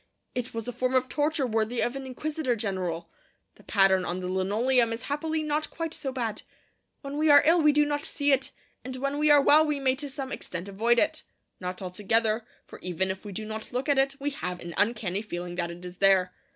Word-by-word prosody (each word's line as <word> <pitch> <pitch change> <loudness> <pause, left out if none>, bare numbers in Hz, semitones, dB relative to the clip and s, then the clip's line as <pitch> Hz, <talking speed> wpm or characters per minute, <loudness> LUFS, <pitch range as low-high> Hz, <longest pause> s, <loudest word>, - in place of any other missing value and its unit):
It 250 0 -3
was 225 0 -5
a 245 - -3
form 255 +2 0
of 255 0 +3
torture 295 -1 0
worthy 225 0 0
of 240 - 0
an 270 -1 -6
inquisitor 295 0 -2
general. 185 -6 -3 0.4
The - - -20
pattern 195 -2 +4
on 180 +1 -3
the 180 - -4
linoleum 225 +6 +2
is 230 - -6
happily 310 +2 -2
not 305 0 -1
quite 330 -1 -4
so 270 - -4
bad. 230 -5 -3 0.6
When 280 +1 -5
we 310 0 +3
are 290 -1 +8
ill 335 +2 +5
we 300 -1 +6
do 295 0 +3
not 290 0 -2
see 285 0 0
it; 270 -1 +2 0.3
and 255 0 -6
when 275 +2 -2
we 300 0 +3
are 295 -1 +8
well 305 +2 +7
we 300 -2 -1
may 265 -1 +2
to 290 0 -6
some 270 0 -5
extent 180 +1 -5
avoid 225 +5 +2
it. 310 +4 +2 0.4
Not 180 +1 -5
altogether; 215 +4 +1 0.2
for - - -12
even 185 +1 -1
if 190 - -8
we 205 - -6
do 215 +3 -5
not 220 0 -6
look 255 +3 -2
at 285 -2 +3
it, 275 +1 +2
we 285 +1 -2
have 180 -12 -4
an 170 -1 -7
uncanny 205 -3 0
feeling 175 -4 -5
that 175 -1 -2
it 175 +1 -9
is 180 0 -9
there. 190 -2 +4
240 Hz, 230 wpm, -27 LUFS, 190-285 Hz, 0.6 s, are